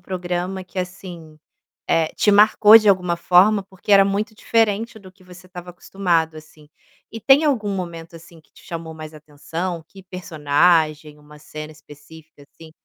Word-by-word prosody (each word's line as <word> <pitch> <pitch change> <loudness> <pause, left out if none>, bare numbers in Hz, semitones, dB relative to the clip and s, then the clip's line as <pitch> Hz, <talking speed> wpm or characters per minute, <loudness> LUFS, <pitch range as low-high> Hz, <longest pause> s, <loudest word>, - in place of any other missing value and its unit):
programa 180 +1 -5
que, 185 - -10
assim, 180 -4 -8 0.5
eh, 165 -1 +1
te 210 - +2
marcou 210 +1 +6
de 215 -1 0
alguma 180 -3 +1
forma 190 +4 +3
porque 190 +1 -5
era 195 -1 +6
muito 205 +3 -3
diferente 225 +1 -1
do 190 -3 -16
que 185 -1 -24
você 180 0 -16
estava 180 -1 -11
acostumado, 170 -3 -2
assim, 155 -1 -16 0.4
e 225 - -8
tem 275 +6 +4
algum 230 -9 -1
momento, 170 -3 -8
assim, 165 0 -17
que 155 - -35
te - - -20
chamou 165 -1 -8
mais 155 0 -11
atenção, 160 +3 -7
que 195 -1 -16
personagem, 155 -3 0
uma 150 0 -17
cena 155 +1 -10
específica, 155 0 -17
assim? 160 +3 -17
175 Hz, 165 wpm, -20 LUFS, 160-195 Hz, 0.5 s, marcou